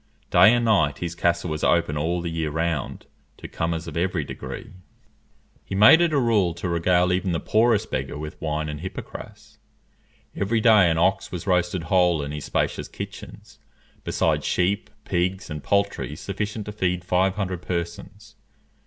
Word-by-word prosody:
Day 90 +5 +7
and 120 -1 +2
night 75 -11 +2
his 85 +1 -4
castle 85 0 0
was 75 - -4
open 85 -3 +2
all 85 +4 -1
the 85 -1 -4
year 80 -2 -2
round 80 -2 -3 0.3
to - - -9
comers 80 0 -3
of - - -8
every 90 -1 0
degree. - - -8 0.9
He - - -6
made 105 - +8
it 170 -2 +3
a 150 - +1
rule 105 -9 +2
to 85 +2 -4
regale 90 +1 +2
even 90 0 0
the 80 - 0
poorest 110 -1 +2
beggar 65 +2 -3
with 75 +1 -8
wine 75 -1 -2
and 75 -1 -5
hippocrass. 95 - -9 0.8
Every 110 +3 0
day 110 -5 +6
an 80 - 0
ox 95 +3 +1
was 90 -3 -5
roasted 90 -2 +1
whole 90 -2 +2
in 70 - -5
his 75 -1 -6
spacious - - -1
kitchens, - - -10 0.4
besides - - 0
sheep, 100 +4 0
pigs, 90 +1 -2
and 75 -2 -6
poultry 100 -5 0
sufficient 105 +4 -4
to 105 - -5
feed 90 -3 -1
five 95 +1 +2
hundred 95 -4 -3
persons. 90 +5 -6
90 Hz, 170 wpm, -24 LUFS, 80-100 Hz, 0.9 s, made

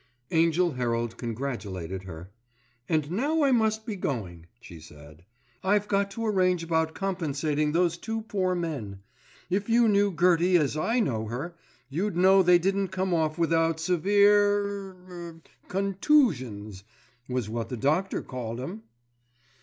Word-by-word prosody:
Angell 165 +2 +3
Herald 120 -3 -2
congratulated 105 -7 -5
her. 90 +1 -9 0.6
"And 155 -2 0
now 290 - +1
I 275 - +4
must 220 -2 +1
be 220 -4 -4
going," 95 - -4
she 85 -8 -12
said, 75 +2 -15 0.4
"I've 205 +2 +2
got 200 -1 +1
to 230 +3 -5
arrange 185 -5 +2
about 160 -1 0
compensating 155 -5 -1
those 170 +1 +1
two 225 0 -4
poor 185 -4 -1
men. 125 - -5 0.5
If 200 +4 -1
you 235 0 +4
knew 205 -1 +3
Gertie 175 +1 +3
as 150 -3 0
I 225 +11 0
know 110 - -1
her, 135 +10 -5 0.3
you'd 175 +7 -2
know 190 +2 +6
they 180 -1 +6
didn't 195 +2 0
come 190 0 -2
off 155 -2 0
without 165 -1 +1
severe 200 +2 +2
er—er—contoosions, 175 - -1 0.5
was 125 -4 -2
what 115 +1 -4
the 125 - -4
doctor 155 - 0
called 120 -3 -6
'em." 180 +12 -6
170 Hz, 140 wpm, -27 LUFS, 125-195 Hz, 0.6 s, know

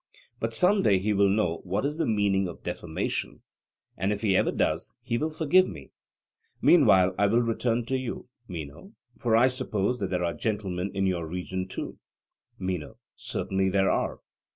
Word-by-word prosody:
But 115 0 0
some 195 - +4
day 100 - +4
he 105 +3 0
will 100 0 +4
know 95 -5 +1
what 100 +7 -1
is 150 +3 -2
the - - +1
meaning 100 -3 +2
of 85 - -9
defamation, 80 -2 -3 0.5
and 95 +3 -1
if 105 -1 -2
he 100 -4 +2
ever - - +3
does, - - -1
he 115 - -2
will 155 - 0
forgive 160 +4 +3
me. - - -10 0.7
Meanwhile 95 - +5
I 100 - +4
will 115 +4 +3
return 115 0 0
to 130 - -1
you, 130 -2 -4 0.2
Meno; 85 +2 -8 0.3
for 115 -2 +2
I 125 +3 +6
suppose 125 -3 -1
that 100 - -2
there 90 -1 0
are 85 - -1
gentlemen 100 -4 -2
in 95 0 +1
your 90 -3 -1
region 90 +1 -4
too? - - -6 0.6
MENO: 90 -5 -4 0.2
Certainly 95 0 -1
there 95 0 +2
are. - - -1
100 Hz, 175 wpm, -27 LUFS, 95-115 Hz, 0.7 s, I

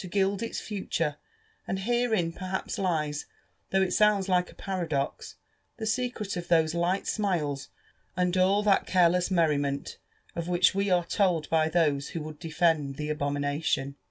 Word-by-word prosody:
gild 195 +2 +1
its 230 - -3
future; 165 -7 -2 0.5
and 190 - -1
herein 220 -6 +1
perhaps 185 +1 -4
lies, 155 -6 -1 0.4
though 190 0 +3
it 180 -1 -1
sounds 210 -2 +3
like 180 -1 +2
a - - -18
paradox, 165 -8 -3 0.4
the 225 - -4
secret 220 -3 -2
of 175 -1 -5
those 160 -2 +3
light 175 +3 0
smiles 160 -10 -1 0.5
and 180 0 +1
all 190 +3 +3
that 200 -2 +3
careless 180 0 +3
merriment 145 -6 0 0.4
of 170 -1 -3
which 180 0 +3
we 200 +1 0
are 175 -2 +3
told 175 -4 +1
by 160 -1 +3
those 150 -4 +1
who - - -3
would 155 0 -8
defend 160 -4 +1
the 150 +1 -3
abomination. 145 -1 -1
175 Hz, 155 wpm, -28 LUFS, 155-195 Hz, 0.5 s, though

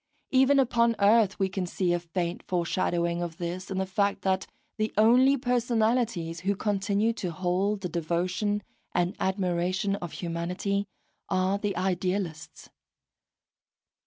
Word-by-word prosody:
Even 265 +1 +5
upon 235 -3 +3
earth 205 0 +4
we 195 - +1
can 190 -1 -3
see 175 0 0
a 175 - +1
faint 170 0 -3
foreshadowing 170 -1 0
of 170 -1 -4
this 180 +2 -5
in 190 - -3
the 190 - 0
fact 200 +1 0
that 190 0 0 0.3
the 215 0 0
only 250 +6 +5
personalities 230 -8 0
who 195 +3 0
continue 205 +2 0
to 190 -5 -4
hold 185 +4 -1
the 180 - -2
devotion 180 +5 -1 0.3
and 175 +3 +1
admiration 190 +1 0
of 175 -4 -7
humanity 180 +4 -2 0.4
are 190 +1 +1
the 205 -1 -2
idealists. 180 -3 -2
190 Hz, 130 wpm, -27 LUFS, 175-210 Hz, 0.4 s, Even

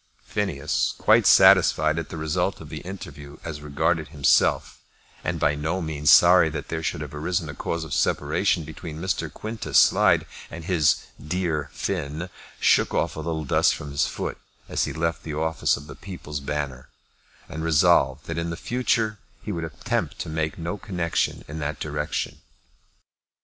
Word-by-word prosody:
Phineas, 80 -8 -1
quite - - +4
satisfied 80 +1 +6
at 80 - -6
the - - -6
result 80 -1 -1
of - - -10
the - - -6
interview 75 -6 -9
as 75 -2 -6
regarded 70 -3 0
himself, 70 -1 +2 0.4
and - - -2
by 75 - +3
no 80 +5 -2
means 75 -3 -1
sorry 90 -1 +7
that 80 - -6
there 80 -1 -2
should 75 - -2
have 75 -2 -7
arisen 80 +2 -2
a - - -5
cause 85 +3 -3
of 80 - -6
separation 85 - +1
between 80 +1 -8
Mr. 85 -3 -2
Quintus 110 -10 -2
Slide - - +5 0.2
and 80 0 -8
his 80 -5 +2 0.2
"dear 75 -2 -2
Finn," 75 +6 -3 0.3
shook - - +3
off - - 0
a - - -6
little 80 0 -3
dust - - +3
from 75 - -8
his 70 - +1
foot - - -4 0.3
as - - 0
he - - -4
left 80 0 -2
the 75 -2 -6
office 80 +1 +1
of 70 - -10
the 75 - -9
People's 75 -2 -7
Banner, 70 -2 -4 0.6
and 80 0 -6
resolved 70 -4 +3
that 80 0 -3
in 85 0 -3
future 110 0 0 0.2
he 105 - -4
would 85 -4 -3
attempt 80 -2 -3
to - - -5
make 80 -1 -2
no 85 +4 -4
connection 90 -4 -2
in 75 +2 -6
that 75 0 -3
direction. 75 0 -3
80 Hz, 170 wpm, -24 LUFS, 75-85 Hz, 0.6 s, sorry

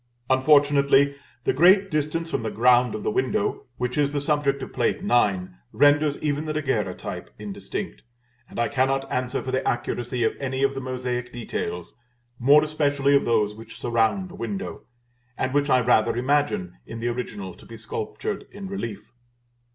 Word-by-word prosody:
Unfortunately, 140 +1 +4 0.3
the - - +1
great 190 +6 +5
distance 155 +2 -1
from - - -1
the 110 - -2
ground 125 +1 +4
of 110 - -5
the - - 0
window 200 - -1
which 125 +3 -2
is 140 -1 +2
the 145 - -1
subject 140 -2 0
of - - -8
Plate - - 0
IX. 100 - +2 0.2
renders 145 +4 +4
even 150 0 -1
the 155 - -2
Daguerreotype 155 -1 -3
indistinct; 105 -2 -6 0.5
and - - -11
I 120 - +2
cannot 135 0 0
answer 125 0 -1
for 130 - -4
the 130 - 0
accuracy 120 0 -1
of 110 - +2
any 135 0 -2
of 135 0 +2
the 135 - -5
mosaic 125 -1 -3
details, 90 -6 -5 0.4
more 145 +5 +6
especially 145 -2 +2
of 140 - +3
those 105 -3 +2
which 115 +1 -11
surround 120 - +1
the - - -12
window, 200 0 -5 0.5
and 130 0 -1
which 145 0 +2
I 130 - +5
rather 115 -1 +3
imagine, 130 - 0
in 115 - -7
the 120 +1 -1
original, 105 -6 -5
to - - -17
be 115 - -10
sculptured 110 - -5
in 200 -1 -8
relief. 115 - -6
130 Hz, 170 wpm, -24 LUFS, 120-145 Hz, 0.5 s, more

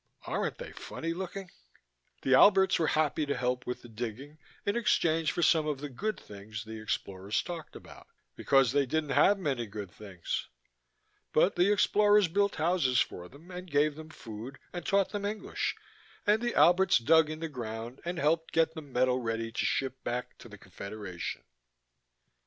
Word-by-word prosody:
Aren't - - -2
they - - -8
funny 165 0 -5
looking? 190 +1 -6 0.7
The 130 - +3
Alberts 190 +5 +6
were 160 - +2
happy 155 0 +1
to 140 - -1
help 125 0 -1
with 125 - -4
the - - -10
digging 120 +6 -7 0.3
in 200 - 0
exchange 165 -8 +2
for 175 - -1
some 155 -2 +4
of 145 -3 -2
the 145 +1 -5
good 215 - -3
things 105 +1 -8
the 110 0 -8
explorers 100 -1 -2
talked 170 -3 -7
about, - - -13 0.3
because 135 -3 +3
they 140 0 +2
didn't 155 +1 -1
have 200 +8 +5
many 135 - -2
good 100 -3 -7
things. 95 -5 -5 0.9
But 180 +5 +4
the 180 +3 +4
explorers 205 0 +4
built 200 +4 +1
houses 155 -6 +2
for 90 0 -2
them 160 +7 -15
and 180 0 -8
gave 145 +1 +2
them 155 +1 -10
food 120 -1 -9 0.2
and 175 -2 -5
taught 195 +1 +2
them 205 -1 -4
English, 210 +1 -2 0.5
and 210 +2 +3
the 240 0 -1
Alberts 180 +1 +5
dug 155 +6 +4
in 155 0 -5
the 165 - -3
ground 120 -3 -6
and 175 +1 -3
helped 165 +1 +1
get 160 0 +3
the 160 - -7
metal 130 -3 +1
ready 115 -1 -3
to 115 - -1
ship 130 -1 -1
back 125 +1 -3
to 120 - -12
the 105 - -11
Confederation. 100 -1 -7
150 Hz, 175 wpm, -30 LUFS, 120-175 Hz, 0.9 s, Alberts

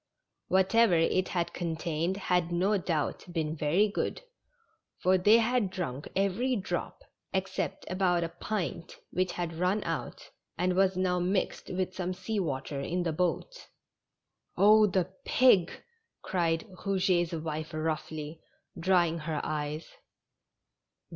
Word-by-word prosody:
Whatever 190 +2 +4
it 175 +3 +2
had 175 -3 -2
contained 165 +1 -2
had 180 -3 0
no 185 +5 +2
doubt 165 -6 -1
been 160 -2 -2
very 165 +7 +2
good, 210 - -3 0.7
for 185 +1 +3
they 205 +5 +6
had 230 -2 +2
drunk 165 -8 -4
every 200 +7 +1
drop, 190 -4 -4 0.3
except - - -2
about 185 -2 +1
a 165 - -2
pint 175 -3 -4
which 185 0 0
had 170 -2 -3
run 185 +4 +1
out, - - -5 0.3
and 180 0 +1
was 190 0 +3
now 180 -1 +1
mixed 185 +2 -1
with 185 0 -2
some 185 0 -3
sea 195 +3 -3
water 140 -4 -3
in 175 +5 -1
the 165 -2 -1
boat. 180 - -2 0.5
" - - -48
Oh, 215 +1 +7
the 185 -1 -1
pig! 205 -9 +4 0.3
" 455 - -52
cried 165 -2 0 0.2
Eouget's 185 -3 +1
wife 155 -1 -4
roughly, 155 0 -4 0.4
drying 170 -2 +2
her 155 -1 -3
eyes. 150 +1 -3
180 Hz, 135 wpm, -29 LUFS, 165-190 Hz, 0.7 s, Oh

